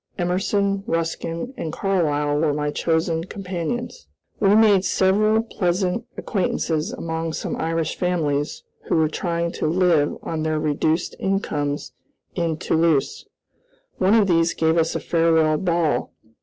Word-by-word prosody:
Emerson, 195 +2 0
Ruskin, 165 +6 -2
and 160 - -4
Carlyle 150 -7 0
were 150 -2 +1
my 150 0 -1
chosen 160 +1 0
companions. 195 - -5 0.3
We 205 -1 +4
made 210 -4 +5
several 215 +4 +2
pleasant 185 +1 -1
acquaintances 175 -3 -1
among 165 -7 -4
some - - -3
Irish 165 0 -1
families 150 -5 -1 0.2
who - - 0
were 160 -1 +3
trying 170 0 -2
to - - -2
live 165 -3 +2
on 160 -1 -3
their 155 0 0
reduced 155 +2 0
incomes 150 -7 -2 0.4
in 165 -3 -1
Toulouse. 160 -3 +1 0.7
One 195 +3 +4
of 220 -3 +5
these 165 -1 +2
gave 160 0 +2
us 165 -1 +1
a - - 0
farewell 160 -2 +2
ball. 165 -7 0
165 Hz, 130 wpm, -22 LUFS, 160-190 Hz, 0.7 s, made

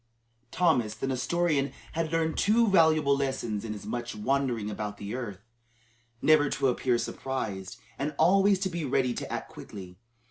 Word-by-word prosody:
Thomas 125 -10 +2
the 110 - -4
Nestorian 140 +2 0 0.2
had 160 -1 -2
learned 165 -1 0
two 225 +3 +3
valuable 155 -6 +4
lessons 130 -6 -2
in 110 -2 -4
his 105 - -9
much 120 -1 -4
wandering 125 -1 0
about 105 0 -4
the 100 +1 -6
earth, 110 -5 -6 0.8
never 155 -2 +5
to 135 -1 +1
appear 125 0 +1
surprised, 110 -8 -4 0.2
and 145 +2 -2
always 195 +4 +5
to 190 - 0
be 170 -1 -3
ready 130 -2 +1
to - - -6
act - - -4
quickly. 90 -2 -10
135 Hz, 155 wpm, -28 LUFS, 110-160 Hz, 0.8 s, never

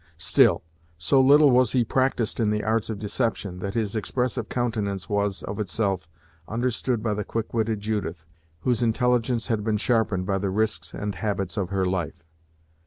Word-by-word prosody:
Still, 80 - +3 0.3
so 90 - +3
little 145 +2 +6
was 125 -2 +4
he 125 -3 +3
practised 130 -3 0
in 110 -2 +2
the 105 0 0
arts 110 0 0
of 110 - -3
deception, 105 -3 -2
that 100 +3 -4
his 110 -2 -1
expressive 120 +2 -1
countenance 110 -6 -2
was, 100 -2 -1
of 100 - -5
itself, 95 -3 -1 0.4
understood 120 0 -1
by 110 -2 0
the 105 0 -2
quick 115 +1 -4
witted 110 -2 0
Judith, 100 -6 -3 0.4
whose 125 -3 +1
intelligence 120 0 +1
had 110 -3 0
been 110 -1 +1
sharpened 105 -5 +1
by 95 0 0
the 100 0 -1
risks 95 -5 -1
and 105 0 -3
habits 95 -1 -2
of 95 -4 -2
her 95 -1 0
life. 85 -3 -2
105 Hz, 175 wpm, -25 LUFS, 100-115 Hz, 0.4 s, little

